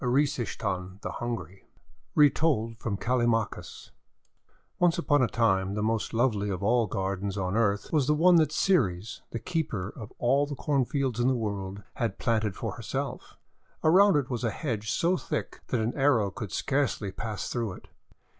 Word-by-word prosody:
ERYSICHTHON 120 Hz, -8 st, -1 dB
THE -, -, -3 dB
HUNGRY 100 Hz, -6 st, -5 dB, 0.5 s
Retold 140 Hz, -6 st, +3 dB
from 105 Hz, -3 st, -2 dB
Callimachus 120 Hz, -2 st, -1 dB, 0.9 s
ONCE 175 Hz, -2 st, +3 dB
upon 145 Hz, -4 st, +2 dB
a 125 Hz, -, +4 dB
time, 100 Hz, -4 st, +1 dB
the 105 Hz, -, -1 dB
most 110 Hz, 0 st, 0 dB
lovely 115 Hz, -4 st, +1 dB
of 95 Hz, -1 st, -3 dB
all 115 Hz, +1 st, +3 dB
gar 95 Hz, 0 st, -1 dB
dens 100 Hz, +1 st, -4 dB
on 95 Hz, 0 st, -1 dB
earth 105 Hz, 0 st, +1 dB
was 145 Hz, -4 st, +3 dB
the 150 Hz, -, +3 dB
one 175 Hz, +3 st, +6 dB
that 155 Hz, -2 st, +3 dB
Ceres, 115 Hz, -, +1 dB
the -, -, -4 dB
Keeper 115 Hz, -, -3 dB
of 110 Hz, -2 st, -9 dB
All 135 Hz, +4 st, +2 dB
the 145 Hz, -, -5 dB
Cornfields 135 Hz, -3 st, 0 dB
in 120 Hz, -, +3 dB
the 130 Hz, -, +3 dB
World, 100 Hz, -3 st, -4 dB
had 115 Hz, -5 st, -1 dB
planted 110 Hz, -5 st, 0 dB
for -, -, -4 dB
herself. -, -, -5 dB, 0.5 s
Around 190 Hz, +4 st, +6 dB
it 140 Hz, -3 st, +1 dB
was 125 Hz, -1 st, -2 dB
a 115 Hz, -, +2 dB
hedge 110 Hz, -4 st, -3 dB
so 175 Hz, +8 st, +2 dB
thick 150 Hz, -, -4 dB
that 125 Hz, -, 0 dB
an 110 Hz, +2 st, -1 dB
arrow 130 Hz, -8 st, +3 dB
could 100 Hz, -1 st, -6 dB
scarcely 135 Hz, -, 0 dB
pass 110 Hz, 0 st, -4 dB
through 115 Hz, -5 st, -2 dB
it. -, -, -13 dB
115 Hz, 170 wpm, -28 LUFS, 100-140 Hz, 0.9 s, one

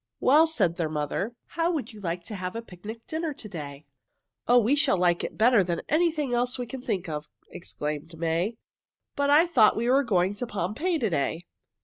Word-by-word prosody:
"Well," 305 Hz, +5 st, +5 dB
said 185 Hz, -, 0 dB
their 165 Hz, -3 st, -1 dB
mother, 155 Hz, -, -2 dB
"how 335 Hz, 0 st, 0 dB
would 280 Hz, -9 st, -3 dB
you 210 Hz, -, -12 dB
like 175 Hz, -1 st, -3 dB
to 215 Hz, -, -8 dB
have 185 Hz, 0 st, -5 dB
a 230 Hz, -, -4 dB
picnic 220 Hz, +4 st, -10 dB
dinner 315 Hz, -2 st, -3 dB
to 220 Hz, -, -8 dB
day?" 145 Hz, -6 st, -8 dB, 0.6 s
"Oh, 245 Hz, -, +6 dB
we 240 Hz, +4 st, +4 dB
should 290 Hz, -9 st, +3 dB
like 175 Hz, -1 st, +2 dB
it -, -, -5 dB
better 230 Hz, -2 st, +5 dB
than 170 Hz, -2 st, -2 dB
anything 310 Hz, -4 st, +1 dB
else 245 Hz, +1 st, +1 dB
we 250 Hz, -, -3 dB
can 260 Hz, +2 st, -7 dB
think 190 Hz, -8 st, -2 dB
of!" 150 Hz, -1 st, -5 dB, 0.2 s
exclaimed 155 Hz, 0 st, -5 dB
May. 170 Hz, +7 st, -1 dB, 0.6 s
"But 285 Hz, 0 st, +1 dB
I 300 Hz, +4 st, +6 dB
thought 335 Hz, -11 st, +4 dB
we 235 Hz, +2 st, 0 dB
were 265 Hz, +3 st, +5 dB
going 190 Hz, -5 st, +1 dB
to 235 Hz, +4 st, -5 dB
Pompeii 215 Hz, -, -1 dB
to 230 Hz, -8 st, 0 dB
day." 160 Hz, +3 st, -1 dB
215 Hz, 205 wpm, -27 LUFS, 170-265 Hz, 0.6 s, Oh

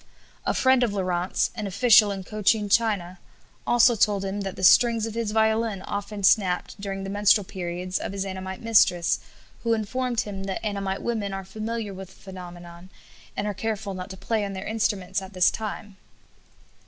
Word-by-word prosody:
A -, -, +1 dB
friend 260 Hz, -1 st, +4 dB
of 235 Hz, -4 st, +1 dB
Laurent's, 180 Hz, -1 st, 0 dB
an 215 Hz, -3 st, -4 dB
official 210 Hz, +2 st, +5 dB
in 195 Hz, -1 st, -5 dB
Cochin 210 Hz, +1 st, +1 dB
China, 200 Hz, -4 st, +1 dB, 0.5 s
also 240 Hz, 0 st, +5 dB
told 200 Hz, -2 st, +2 dB
him 195 Hz, +1 st, -3 dB
that 195 Hz, -1 st, -4 dB
the -, -, -7 dB
strings 230 Hz, +3 st, +5 dB
of 225 Hz, -, -5 dB
his 230 Hz, -2 st, -2 dB
violin 220 Hz, -2 st, +1 dB
often 205 Hz, 0 st, -5 dB
snapped 190 Hz, 0 st, +2 dB
during 195 Hz, -1 st, -4 dB
the 195 Hz, -, -5 dB
menstrual 205 Hz, +1 st, +4 dB
periods 180 Hz, -1 st, -4 dB
of -, -, -4 dB
his 195 Hz, 0 st, -3 dB
Annamite 190 Hz, +3 st, -6 dB
mistress, 185 Hz, -6 st, +3 dB, 0.4 s
who 230 Hz, -1 st, +1 dB
informed 240 Hz, +2 st, -1 dB
him 195 Hz, -2 st, -6 dB
that 195 Hz, +3 st, -4 dB
Annamite 195 Hz, -2 st, -2 dB
women 215 Hz, -4 st, -2 dB
are 195 Hz, -1 st, -5 dB
familiar 215 Hz, +1 st, -4 dB
with 190 Hz, -1 st, -9 dB
the -, -, -18 dB
phenomenon, 175 Hz, -1 st, -11 dB, 0.5 s
and 205 Hz, -, -1 dB
are 210 Hz, -, -1 dB
careful 205 Hz, 0 st, -3 dB
not 185 Hz, +1 st, -6 dB
to 190 Hz, -, -8 dB
play 220 Hz, +2 st, -1 dB
on 200 Hz, -1 st, -4 dB
their 190 Hz, +1 st, -6 dB
instruments 200 Hz, -3 st, -1 dB
at 190 Hz, +1 st, -10 dB
this 185 Hz, -1 st, +4 dB
time. 210 Hz, -2 st, -6 dB
200 Hz, 180 wpm, -25 LUFS, 190-220 Hz, 0.5 s, official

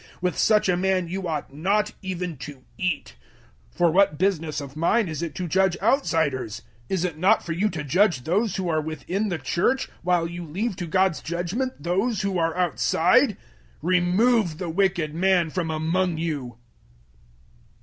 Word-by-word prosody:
With 180 Hz, 0 st, -1 dB
such 215 Hz, -2 st, +3 dB
a 180 Hz, -, +3 dB
man 185 Hz, -1 st, +1 dB
you 190 Hz, 0 st, -3 dB
ought 150 Hz, -4 st, -4 dB
not 205 Hz, +8 st, +1 dB
even 180 Hz, -3 st, -4 dB
to 140 Hz, -1 st, -9 dB
eat. 180 Hz, -4 st, -2 dB, 0.6 s
005:012 -, -, -27 dB
For 175 Hz, -2 st, +4 dB
what 185 Hz, -4 st, +3 dB
business 165 Hz, -4 st, 0 dB
of 140 Hz, -1 st, -8 dB
mine 185 Hz, +7 st, +2 dB
is 155 Hz, -2 st, -4 dB
it 170 Hz, -2 st, -4 dB
to 180 Hz, -2 st, -3 dB
judge 190 Hz, +1 st, +2 dB
outsiders? 155 Hz, -, 0 dB, 0.3 s
Is 185 Hz, -2 st, 0 dB
it 165 Hz, -4 st, -4 dB
not 185 Hz, +4 st, +3 dB
for 170 Hz, -, -4 dB
you 190 Hz, +6 st, +1 dB
to 160 Hz, -5 st, -5 dB
judge 165 Hz, -, +2 dB
those 195 Hz, -, 0 dB
who 190 Hz, -2 st, -2 dB
are 155 Hz, -2 st, +1 dB
within 165 Hz, +7 st, -3 dB
the 175 Hz, -, -1 dB
Church 175 Hz, -, 0 dB
005:013 -, -, -25 dB
while 175 Hz, -1 st, +1 dB
you 175 Hz, +1 st, -6 dB
leave 190 Hz, +7 st, -3 dB
to 175 Hz, -3 st, -4 dB
God's 185 Hz, 0 st, +1 dB
judgement 175 Hz, -, -3 dB
those 195 Hz, +5 st, 0 dB
who 195 Hz, -2 st, 0 dB
are 165 Hz, +1 st, 0 dB
outside? 180 Hz, -4 st, +3 dB, 0.5 s
Remove 180 Hz, +2 st, +2 dB
the 180 Hz, -1 st, -4 dB
wicked 175 Hz, -4 st, +1 dB
man 175 Hz, -1 st, +2 dB
from 175 Hz, -2 st, -2 dB
among 165 Hz, +2 st, 0 dB
you. 145 Hz, -8 st, -4 dB
175 Hz, 175 wpm, -24 LUFS, 160-190 Hz, 0.6 s, For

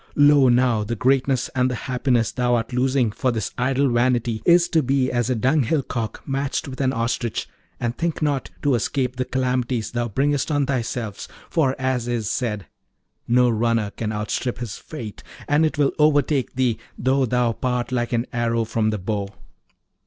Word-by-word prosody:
Lo, 145 Hz, -2 st, +6 dB
now, 120 Hz, -3 st, +3 dB
the 115 Hz, +3 st, -3 dB
greatness 130 Hz, +1 st, +2 dB
and 125 Hz, -1 st, +2 dB
the 125 Hz, -, -2 dB
happiness 125 Hz, -3 st, +1 dB
thou 125 Hz, -1 st, +1 dB
art 115 Hz, +1 st, -2 dB
losing 125 Hz, -2 st, +2 dB
for 130 Hz, +4 st, 0 dB
this 110 Hz, -4 st, -3 dB
idle 135 Hz, +2 st, +1 dB
vanity 120 Hz, -2 st, +1 dB
is 170 Hz, 0 st, +6 dB
to 160 Hz, -, +2 dB
be 130 Hz, -1 st, +1 dB
as 120 Hz, -1 st, 0 dB
a 130 Hz, -, +1 dB
dunghill 135 Hz, +4 st, +2 dB
cock 115 Hz, -3 st, -4 dB
matched 135 Hz, 0 st, -2 dB
with 130 Hz, 0 st, -6 dB
an 130 Hz, -1 st, +2 dB
ostrich; 115 Hz, -1 st, -2 dB, 0.3 s
and 120 Hz, 0 st, -2 dB
think 170 Hz, -1 st, -1 dB
not 145 Hz, -3 st, -1 dB
to 145 Hz, -2 st, +3 dB
escape 125 Hz, +2 st, 0 dB
the 130 Hz, -, -1 dB
calamities 125 Hz, -3 st, -1 dB
thou 120 Hz, 0 st, -1 dB
bringest 140 Hz, +6 st, 0 dB
on 145 Hz, -2 st, +1 dB
thyself, 120 Hz, -5 st, -3 dB, 0.2 s
for 135 Hz, -5 st, +2 dB
as 130 Hz, -2 st, -1 dB
is 120 Hz, -3 st, -1 dB
said, 105 Hz, -6 st, -2 dB, 0.6 s
No 125 Hz, +1 st, +4 dB
runner 115 Hz, -2 st, +1 dB
can 110 Hz, 0 st, -4 dB
outstrip 105 Hz, +3 st, -2 dB
his 120 Hz, -5 st, -5 dB
fate; 115 Hz, -10 st, -8 dB, 0.3 s
and 150 Hz, +2 st, +3 dB
it 155 Hz, -, -5 dB
will 145 Hz, -2 st, +2 dB
overtake 145 Hz, -3 st, +2 dB
thee, 125 Hz, -3 st, +1 dB, 0.2 s
though 130 Hz, +1 st, +2 dB
thou 125 Hz, 0 st, +2 dB
part 125 Hz, +1 st, -2 dB
like 120 Hz, -2 st, -1 dB
an 120 Hz, 0 st, 0 dB
arrow 115 Hz, -1 st, 0 dB
from 110 Hz, -1 st, 0 dB
the 105 Hz, -, -1 dB
bow.' 100 Hz, +1 st, -3 dB
125 Hz, 180 wpm, -22 LUFS, 115-135 Hz, 0.6 s, Lo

